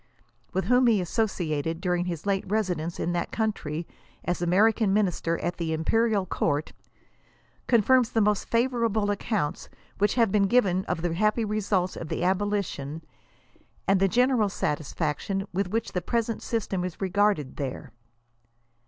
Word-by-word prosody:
with 190 - -1
whom 250 0 +4
he 220 -4 +4
associated 165 -5 -1
during 180 -1 0
his 170 -2 -4
late 195 -1 +1
residence 180 -5 -1
in 175 - -1
that 175 - -2
country 170 -8 -2 0.4
as 175 +1 -1
American 200 +4 +3
Minister 180 -5 +1
at 175 - -2
the 165 -2 -2
Imperial 210 +5 +1
Court, 150 -3 -1 0.9
confirms 245 +1 +4
the 225 - 0
most 210 -1 +1
favor 240 +1 +1
able 215 -2 +1
accounts 205 -6 -2 0.3
which 205 0 +2
have 230 -5 +3
been 200 -1 +3
given 190 -5 +2
of 160 - -3
the 175 -2 0
happy 215 +5 +1
results 200 -3 0
of 165 - -6
the 170 - -3
abolition, 185 -6 -1 0.8
and 195 -1 +4
the 195 - +4
general 245 0 +3
satisfaction 160 +4 -2
with 190 0 -1
which 225 +3 -2
the 180 - -2
present 230 +3 -1
system 200 -5 -2
is 180 -2 -4
regartled 195 -6 +1
there. 135 -1 -5
195 Hz, 150 wpm, -26 LUFS, 175-215 Hz, 0.9 s, whom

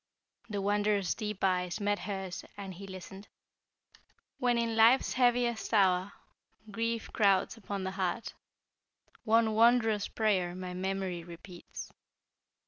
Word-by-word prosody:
The 205 -2 -3
Wanderer's 205 -1 +1
deep 210 -3 -5
eyes 180 -2 +1
met 205 0 0
hers 190 -2 -5
and 195 -2 -6
he 195 +3 -10
listened. 190 +1 -10 1.1
"When 245 -1 +2
in 230 -1 0
life's 230 +4 +5
heaviest 245 -2 +1
hour 190 -1 +3 0.6
Grief 230 +1 -2
crowds 200 -2 +3
upon 200 -3 -5
the 190 - -2
heart 190 +3 -2 0.9
One 225 0 +3
wondrous 225 -2 +4
prayer 190 -5 0
My 185 -1 -6
memory 190 -1 -3
repeats. 175 +1 -10
200 Hz, 120 wpm, -31 LUFS, 185-225 Hz, 1.1 s, life's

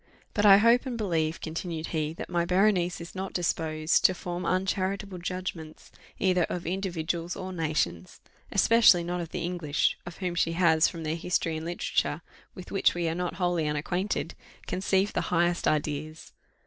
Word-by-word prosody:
"But 210 0 +3
I 195 -1 +10
hope 235 +5 +4
and 245 -2 -3
believe," 165 -7 -1
continued 165 0 -4
he, 155 -2 -1
"that - - -7
my 175 -1 0
Berenice 180 -1 +2
is 170 0 -9
not 190 0 -5
disposed 160 -2 0
to 185 - +5
form 175 0 -4
uncharitable 190 +1 -1
judgments 175 -3 -6 0.3
either 180 -2 +2
of 175 -1 -5
individuals 175 -2 -2
or 185 0 -6
nations; 150 - -2 0.3
especially 225 -7 +5
not 175 +1 -3
of 165 - -6
the - - -4
English, 170 -4 0
of 175 - -8
whom 180 -2 -2
she 165 -1 +1
has, 165 -2 +4
from 165 -2 -6
their 155 +1 -1
history 165 -1 -1
and 160 +1 -5
literature, 170 -2 -1 0.3
with 185 - -10
which 195 - +2
we 175 -1 -1
are - - -1
not 180 0 -3
wholly 175 -3 0
unacquainted, 170 +4 -2 0.3
conceived 190 +2 0
the - - 0
highest 175 0 +1
ideas." 155 +1 -2
175 Hz, 170 wpm, -28 LUFS, 160-185 Hz, 0.3 s, I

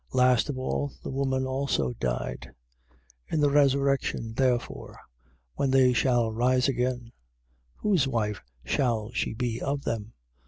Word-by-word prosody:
Last 125 0 +3
of 140 - -3
all 130 +2 -2
the - - -5
woman 130 -1 0
also 130 - -1
died. - - -4 0.8
12:23. - - -9
In 160 - +2
the 145 -1 +4
resurrection 140 -5 +2
therefore, 125 -1 -1 0.6
when 135 - 0
they 130 -1 +5
shall 120 -2 +2
rise 125 +3 +2
again, 125 -2 -1 0.6
whose 185 -10 +1
wife 105 -5 -1 0.2
shall 115 - 0
she 115 - -2
be 120 -1 -2
of 140 0 -2
them? 110 -1 -3
130 Hz, 140 wpm, -27 LUFS, 115-135 Hz, 0.8 s, they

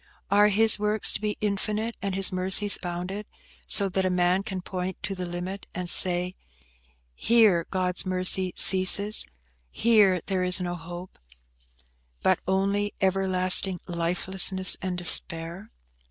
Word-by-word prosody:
Are 205 +1 +3
His 220 +1 +2
works 210 0 -1
to - - -6
be 210 -1 -5
infinite, 215 +2 -4
and 195 -1 -5
His 195 0 +5
mercies 190 +2 +3
bounded, 180 +4 -7 0.4
so 200 - -2
that 190 +1 -3
a 185 - -2
man 180 +1 -1
can 190 -2 -8
point 185 0 -7
to 195 - -5
the 180 -2 -7
limit, 180 +3 -8
and 180 0 -6
say, 180 0 +4 0.8
Here 210 - 0
God's 185 -1 -4
mercy 185 0 +1
ceases; 200 +3 +4 0.4
here 210 - +1
there 190 -2 -3
is 180 0 -1
no 175 -1 -5
hope–but - - -9
only 200 +2 -3
everlasting 190 -1 0
lifelessness 185 +2 +2
and 185 -1 -6
despair? 175 +2 +4
185 Hz, 130 wpm, -23 LUFS, 175-200 Hz, 0.8 s, His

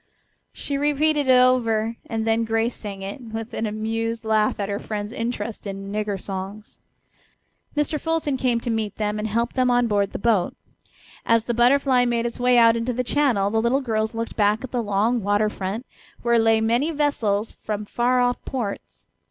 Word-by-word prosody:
She 280 -1 -4
repeated 295 0 +2
it - - +5
over 235 -3 +3
and 225 -1 -2
then 225 0 +2
Grace 225 +1 0
sang 200 -2 -7
it, 200 +7 -6
with 225 0 -6
an 225 - -2
amused 225 +1 -3
laugh 215 -1 +1
at 200 - -1
her 200 0 -2
friend's 210 -1 -5
interest 230 -2 -4
in 195 0 -6
"nigger 210 -1 -2
songs." 195 +3 -7 1.0
Mr. 295 +1 0
Fulton 325 -3 -1
came 250 -2 +1
to 240 - -2
meet 220 -3 -2
them 210 0 -2
and 215 - -2
helped 230 +3 -1
them 255 -1 +2
on 245 0 +3
board 205 -3 +1
the - - -4
boat. 210 -4 +1 0.7
As 230 -1 +3
the 240 - -2
Butterfly 250 +1 +4
made 235 -1 0
its 235 - -4
way 250 0 +4
out 230 -1 +6
into 230 +2 -1
the 250 +2 -1
channel 245 -7 +1
the 220 0 +2
little 240 +4 +2
girls 220 -3 -1
looked 230 0 -4
back 210 +2 +2
at 260 - -6
the 245 - 0
long 220 +3 +1
water 205 +1 +2
front, 205 +5 -4 0.4
where 235 -1 +3
lay 225 0 +3
many 235 +7 +1
vessels 235 -9 0
from 210 -1 -3
far 245 +4 +1
off 245 0 0
ports. 230 -7 -5
230 Hz, 190 wpm, -23 LUFS, 210-245 Hz, 1.0 s, out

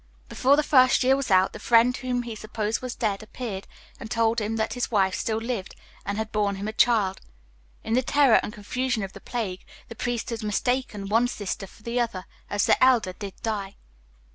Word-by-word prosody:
Before 270 +2 +3
the 300 - +2
first 255 -3 +5
year 260 +1 +5
was 275 -3 -3
out, 190 -1 +4
the - - -8
friend 240 +1 +4
whom 250 -2 -2
he 235 -2 -6
supposed 215 +1 -3
was 255 -1 -5
dead 205 -3 -1
appeared, 215 -3 -6 0.3
and 225 - -8
told 230 0 +1
him 215 +2 -2
that 220 0 -1
his 245 - -2
wife 195 -4 +2
still 220 +2 -1
lived, 225 -4 -4 0.3
and 200 +1 -2
had 220 0 -3
borne 205 -2 0
him 200 +2 -5
a 215 - -4
child. 215 -5 +2 0.6
In 225 - -2
the 250 - +4
terror 275 -2 +4
and - - -5
confusion 235 +2 -2
of 195 - -6
the - - -11
plague, 200 -7 -4 0.3
the 230 - -8
priest 240 +1 -3
had 230 0 -4
mistaken 215 -1 -1
one 230 +4 +3
sister 205 -4 -4
for 210 - -19
the 235 +2 -1
other, 225 -6 -2 0.2
as 205 -1 +1
the - - +4
elder 240 -8 +4
did 195 0 -8
die." 205 -3 -3
225 Hz, 210 wpm, -25 LUFS, 205-245 Hz, 0.6 s, first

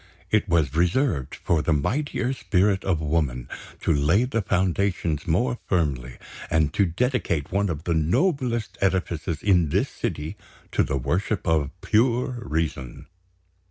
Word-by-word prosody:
It 110 -1 +2
was 80 -6 +2
reserved 85 - +1
for 85 -3 0
the 80 - +1
mightier 125 - -1
spirit 100 -5 +1
of 85 -5 0
woman 75 -6 -1 0.3
to - - +2
lay 80 - +3
the 125 -3 -1
foundations 90 -4 0
more 115 +9 +1
firmly, 70 -9 -1 0.3
and 80 -2 +2
to 100 - +3
dedicate 90 - -1
one 100 +1 +1
of 80 -2 -4
the 85 - 0
noblest 120 - 0
edifices 90 -4 -1
in 90 -6 +3
this - - +1
city 75 +1 -4 0.3
to - - +2
the 70 - 0
Worship 95 - -1
of 80 -4 +2
Pure 120 +4 +1
Reason. 75 -6 -3
85 Hz, 140 wpm, -25 LUFS, 75-105 Hz, 0.3 s, lay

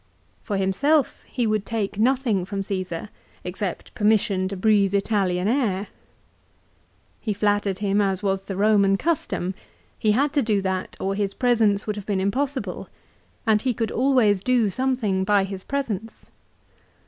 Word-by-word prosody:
For 205 -3 -3
himself 270 +11 +1
he 245 - -1
would 215 -2 +1
take 210 -2 -3
nothing 240 -5 +2
from 195 +1 -4
Caesar, 185 -1 -4 0.3
except - - -5
permission 205 -3 +2
to 195 0 -5
breathe 200 -1 +3
Italian 195 -3 +1
air. 210 -6 0 1.3
He 215 - -2
flattered 205 -1 0
him 205 0 +1
as 195 0 0
was 195 -1 -1
the 195 - -5
Eoman 200 -1 +3
custom. 265 - -1 0.5
He 215 -1 +3
had 275 +5 +1
to 290 - +3
do 215 -4 +1
that 190 -1 -3
or 195 +1 -1
his 200 -1 -2
presence 225 -5 +2
would 210 -1 -3
have 205 - -7
been 200 -2 0
impossible, 260 +8 -2 0.6
and 215 -2 +3
he 250 -1 0
could 225 0 -2
always 240 -7 +3
do 240 -1 +2
something 230 -5 0
by 200 0 +3
his 195 -1 -6
presence. 225 -6 -4
205 Hz, 150 wpm, -24 LUFS, 195-230 Hz, 1.3 s, breathe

